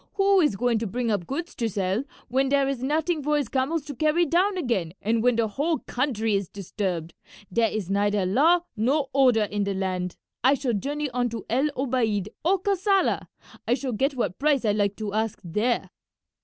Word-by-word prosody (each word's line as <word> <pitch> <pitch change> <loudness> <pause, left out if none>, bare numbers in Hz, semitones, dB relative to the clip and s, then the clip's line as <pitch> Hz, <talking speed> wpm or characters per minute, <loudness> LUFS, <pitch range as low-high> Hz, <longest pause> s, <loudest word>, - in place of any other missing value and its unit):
Who 395 -1 +4
is 295 - +2
going 235 +1 +1
to 225 - -2
bring 235 +3 -1
up 195 -5 -1
goods 335 +6 -4
to 230 -2 -2
sell 195 +3 -1 0.2
when 265 +2 +1
there 280 -1 +3
is 270 -3 -2
nothing 310 +4 0
for 300 +1 +1
his 280 -6 -2
camels 280 +4 -1
to 290 -2 -7
carry 310 +5 +2
down 370 +5 +2
again 215 - -1
and 225 +2 0
when 245 0 +3
the 230 -1 +1
whole 295 +9 0
country 230 -4 -1
is 195 -3 -1
disturbed? 180 -4 -4 0.4
There 225 +3 +2
is 200 -4 -4
neither 205 -1 +1
law 310 - +4
nor 270 +5 +1
order 255 -5 +4
in 205 0 -1
the 200 -1 -2
land. 185 -2 -2 0.3
I 265 +3 +5
shall 260 -3 -1
journey 285 +6 -2
on 245 0 0
to 230 -1 -6
El 270 +5 +2
Obeid 230 -7 0
or 370 +5 +3
Kassala; 390 0 +1 0.4
I 240 - +3
shall 255 -1 -4
get 270 +6 0
what 210 -8 -2
price 280 -3 +2
I 210 - +3
like 205 -1 0
to 210 -2 -5
ask 220 0 -1
there." 210 +8 -1
245 Hz, 200 wpm, -25 LUFS, 205-290 Hz, 0.4 s, I